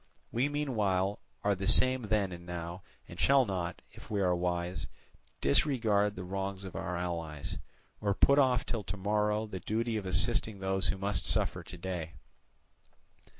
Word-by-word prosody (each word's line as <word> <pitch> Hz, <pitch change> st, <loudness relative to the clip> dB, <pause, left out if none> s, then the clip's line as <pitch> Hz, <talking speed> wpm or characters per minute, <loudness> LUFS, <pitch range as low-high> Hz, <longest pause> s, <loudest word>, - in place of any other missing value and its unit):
We 125 Hz, +5 st, +1 dB
meanwhile 105 Hz, -10 st, 0 dB, 0.2 s
are 105 Hz, -, +3 dB
the 95 Hz, 0 st, -3 dB
same 130 Hz, +1 st, +5 dB
then 100 Hz, -3 st, +1 dB
and 85 Hz, -1 st, -8 dB
now, 85 Hz, +1 st, -5 dB, 0.3 s
and -, -, -10 dB
shall 135 Hz, -1 st, +5 dB
not, 90 Hz, -4 st, -3 dB
if -, -, -13 dB
we 105 Hz, -, 0 dB
are 90 Hz, -2 st, +3 dB
wise, 90 Hz, 0 st, -2 dB, 0.5 s
disregard 105 Hz, -, +3 dB
the 90 Hz, -, -5 dB
wrongs 95 Hz, +1 st, -3 dB
of 95 Hz, -, -8 dB
our 90 Hz, 0 st, -3 dB
allies, 85 Hz, -4 st, -4 dB, 0.4 s
or 100 Hz, -2 st, 0 dB
put 140 Hz, +1 st, +5 dB
off 130 Hz, -3 st, +3 dB
till 115 Hz, -3 st, -2 dB
to 95 Hz, -, -4 dB
morrow 105 Hz, +2 st, +1 dB
the 95 Hz, -4 st, -6 dB
duty 110 Hz, +5 st, -1 dB
of 100 Hz, -3 st, -4 dB
assisting 110 Hz, +3 st, +1 dB
those 95 Hz, 0 st, 0 dB
who -, -, 0 dB
must 95 Hz, -2 st, -1 dB
suffer -, -, +1 dB
to 90 Hz, -, -10 dB
day. 85 Hz, -2 st, -4 dB
100 Hz, 165 wpm, -32 LUFS, 90-110 Hz, 0.5 s, same